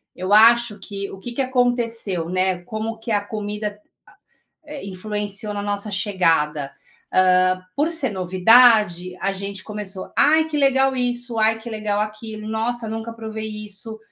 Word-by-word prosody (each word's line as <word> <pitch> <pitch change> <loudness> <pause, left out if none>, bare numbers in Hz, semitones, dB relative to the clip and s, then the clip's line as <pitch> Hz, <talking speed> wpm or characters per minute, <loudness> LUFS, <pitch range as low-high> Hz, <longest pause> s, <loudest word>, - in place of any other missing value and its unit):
Eu 185 +2 -3
acho 230 0 +5
que, 200 0 -6
o - - -10
que 240 +5 -7
que 270 - -1
aconteceu, 235 -8 0
né, 185 0 0
como 220 +4 -5
que 225 - -7
a 205 -2 +2
comida 210 0 -5 0.9
a - - -15
é, 290 - -7
influenciou 205 +1 -2
na 205 - -3
nossa 205 +1 -1
chegada. 165 -8 0 0.4
Hã, 185 0 +3
por 295 +3 +2
ser 325 -7 +2
novidade, 190 -1 +4
a 195 - 0
gente 200 0 -6
começou: 205 -3 -6
"Ai, 315 +2 +5
que 310 - -3
legal 270 -1 +3
isso, 245 -1 -2
ai 220 +1 +2
que 235 +1 -8
legal 215 -2 -2
aquilo. 215 0 -6
Nossa, 225 +1 -1
nunca 225 +1 -5
provei 220 -1 -6 0.2
isso". 210 +2 -4
215 Hz, 155 wpm, -21 LUFS, 195-230 Hz, 0.9 s, acho